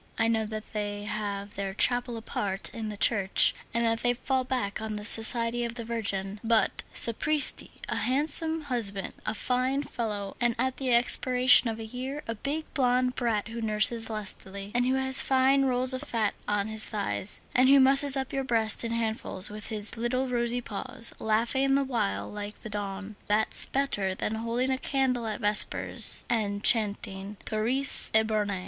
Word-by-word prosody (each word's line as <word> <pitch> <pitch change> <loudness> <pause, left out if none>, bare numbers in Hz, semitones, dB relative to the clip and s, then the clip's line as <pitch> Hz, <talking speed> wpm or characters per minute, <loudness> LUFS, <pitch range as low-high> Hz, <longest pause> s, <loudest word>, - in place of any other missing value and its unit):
I 225 - +1
know 220 -1 0
that 215 0 -8
they 205 -1 -4
have 205 -1 -5
their 195 -1 -5
chapel 245 0 +1
apart 200 -3 -4
in 225 -2 -6
the 210 - -7
church, 200 -3 +4 0.2
and 235 0 -1
that 225 0 0
they 245 0 0
fall 260 +1 -2
back 245 -6 -3
on 220 -1 -5
the 210 0 -6
Society 230 +2 +3
of 235 0 -4
the 235 - -5
Virgin; 200 -3 -3
but, 225 -1 +1
sapristi, 295 +6 +1 0.2
a - - -3
handsome 315 +5 0
husband, 220 -8 -3
a 215 - -2
fine 255 +5 -1
fellow, 210 -7 -5
and 240 -1 +1
at 260 +2 -2
the 260 -2 -2
expiration 250 +1 +5
of 225 0 -5
a 225 - -6
year, 260 +6 -6
a 230 - -3
big, 285 +8 -4
blond 250 -1 +1
brat 230 -4 -2
who 230 +1 -7
nurses 225 +1 +2
lustily, 200 -2 -4
and 245 +1 +1
who 260 - +1
has 265 0 +1
fine 270 +1 +2
rolls 255 0 0
of 260 - -4
fat 230 -8 -2
on 205 0 -1
his 220 0 -1
thighs, 205 -1 -4
and 255 +1 +4
who 275 0 +6
musses 275 +1 +6
up 265 -1 -4
your 270 0 -2
breast 225 -4 +1
in 230 - -4
handfuls 220 -4 -1
with 210 0 -7
his 215 +1 -3
little 255 +3 -2
rosy 240 0 -1
paws, 230 +2 -4
laughing 235 +5 0
the 275 - +1
while 100 - -2
like 205 0 -8
the 215 - -9
dawn,—that's 205 +1 -1
better 205 -9 -1
than 215 - -4
holding 230 +4 -2
a 260 - -2
candle 260 -5 -1
at 215 +2 -5
vespers, 210 0 +5
and 205 -3 -2
chanting 205 -2 0
_Turris 245 +6 +2
Eburnea! 215 -3 +1
230 Hz, 175 wpm, -27 LUFS, 210-255 Hz, 0.2 s, who